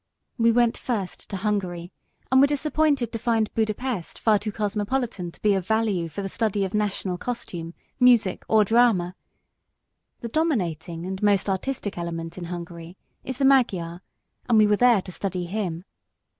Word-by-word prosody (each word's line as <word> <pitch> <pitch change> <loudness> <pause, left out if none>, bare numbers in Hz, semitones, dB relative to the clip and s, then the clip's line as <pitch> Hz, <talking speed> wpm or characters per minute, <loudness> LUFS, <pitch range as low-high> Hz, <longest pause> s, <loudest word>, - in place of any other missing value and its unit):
We 230 0 +5
went 240 0 +3
first 210 -7 -4
to 195 - -3
Hungary 185 -4 -2 0.4
and 260 0 +6
were 280 - +6
disappointed 290 -3 +1
to 230 - -4
find 225 -2 0
Buda 220 -1 0
Pest 245 -9 -4
far 215 -2 +3
too 210 +1 -4
cosmopolitan 210 -2 -2
to - - -20
be 210 -1 +4
of 190 -2 -2
value 215 -6 +1
for 180 +6 -5
the - - -2
study 205 -1 0
of 190 - -6
national 200 -3 -1
costume, 175 -9 -5 0.2
music 240 -7 +4
or 215 -1 +4
drama. 210 -6 +3 1.1
The 235 - -5
dominating 180 - -1
and 190 +1 -5
most 205 -2 +3
artistic 205 0 -2
element 165 -1 -5
in 180 - -6
Hungary 170 0 -8 0.3
is 260 -1 -5
the 270 - +1
Magyar, 185 -11 +2 0.5
and 230 - +5
we 215 - +7
were 210 0 +3
there 235 -3 +4
to 185 - -9
study 185 -1 -3
him. 180 -2 -3
205 Hz, 170 wpm, -25 LUFS, 180-235 Hz, 1.1 s, we